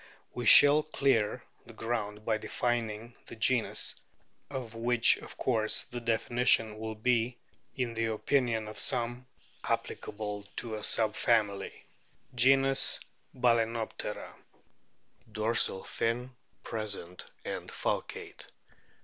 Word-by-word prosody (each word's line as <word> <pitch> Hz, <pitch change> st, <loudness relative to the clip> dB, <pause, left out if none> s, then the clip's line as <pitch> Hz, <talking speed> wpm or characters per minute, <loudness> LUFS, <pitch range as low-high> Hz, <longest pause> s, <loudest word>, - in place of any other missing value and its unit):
We 120 Hz, -, -3 dB
shall 145 Hz, +1 st, +9 dB
clear 135 Hz, -8 st, +1 dB, 0.2 s
the -, -, -11 dB
ground 110 Hz, -2 st, -3 dB
by 110 Hz, -1 st, +1 dB
defining 115 Hz, -1 st, -2 dB
this -, -, -9 dB
genus, 115 Hz, +1 st, +2 dB, 0.6 s
of 130 Hz, -5 st, -6 dB
which 115 Hz, +1 st, +4 dB
of -, -, -11 dB
course 110 Hz, -4 st, 0 dB
the 120 Hz, 0 st, -7 dB
definition 115 Hz, -1 st, +2 dB
will 110 Hz, 0 st, -4 dB
be, 120 Hz, +2 st, +1 dB, 0.4 s
in 125 Hz, -4 st, -2 dB
the 115 Hz, 0 st, -1 dB
opinion 115 Hz, 0 st, 0 dB
of 105 Hz, -, -6 dB
some, 120 Hz, +1 st, -1 dB, 0.4 s
applicable 105 Hz, -1 st, -4 dB
to 115 Hz, -2 st, -4 dB
a 105 Hz, -1 st, -5 dB
sub 110 Hz, -2 st, +2 dB
family. 105 Hz, -4 st, 0 dB, 0.5 s
GENUS, 135 Hz, +2 st, +4 dB, 0.4 s
BAL^ENOPTERA 115 Hz, -2 st, 0 dB, 1.0 s
Dorsal 110 Hz, -3 st, 0 dB
fin 120 Hz, +3 st, -2 dB, 0.3 s
present 100 Hz, -5 st, -4 dB, 0.2 s
and -, -, -5 dB
falcate. -, -, -4 dB
115 Hz, 105 wpm, -30 LUFS, 110-125 Hz, 1.0 s, shall